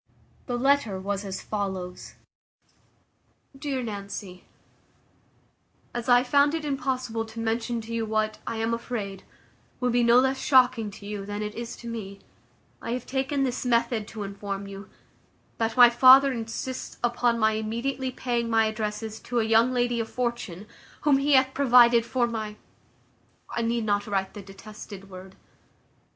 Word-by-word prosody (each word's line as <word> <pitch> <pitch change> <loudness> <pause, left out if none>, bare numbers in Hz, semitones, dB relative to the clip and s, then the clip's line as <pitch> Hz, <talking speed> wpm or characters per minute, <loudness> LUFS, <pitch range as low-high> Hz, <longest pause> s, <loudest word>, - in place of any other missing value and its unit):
The 245 -2 -1
letter 255 -7 +2
was 200 +1 -3
as 195 -1 -6
follows: 190 -4 -5 1.4
"DEAR 270 -2 -3
NANCY, 200 -3 -7 1.5
"As 240 +1 -4
I 245 0 +6
found 285 +4 +3
it 320 -2 -4
impossible 255 -5 -2
to 225 +1 -9
mention 230 +1 -1
to 225 +1 -8
you 230 -1 -1
what, 215 0 -1
I - - -2
am 225 +1 0
afraid, 210 -5 -4 0.6
will 250 -1 +1
be 245 +1 +3
no 235 0 +5
less 265 +1 +3
shocking 255 -5 +4
to 200 0 -12
you, 205 -1 -5
than 205 +1 -4
it 210 0 -4
is 235 0 -6
to 235 - -11
me, 210 -4 -6 0.6
I 230 - -3
have 250 -1 -4
taken 270 +1 -1
this 255 -2 -2
method 235 -3 +1
to 215 -2 -6
inform 200 0 -5
you, 195 0 -9 0.7
that 225 +1 -1
my 245 -1 +9
father 260 +3 +7
insists 230 +2 -5
upon 240 0 +1
my 220 -1 +3
immediately 235 +5 -2
paying 240 -2 -2
my 225 -1 +3
addresses 215 0 -3
to 245 -1 -2
a - - +2
young 225 +3 +4
lady 245 -1 0
of 225 -1 -3
fortune, 235 -6 -3 0.4
whom 285 -3 +4
he 285 +1 +2
hath 265 0 +4
provided 240 -3 +5
for 250 -2 +1
my 220 -3 -4 1.0
I 235 - -2
need 230 0 0
not 205 0 0
write 195 -2 -1
the 205 - -8
detested 195 0 -11
word. 185 +1 -11
230 Hz, 160 wpm, -26 LUFS, 210-250 Hz, 1.5 s, my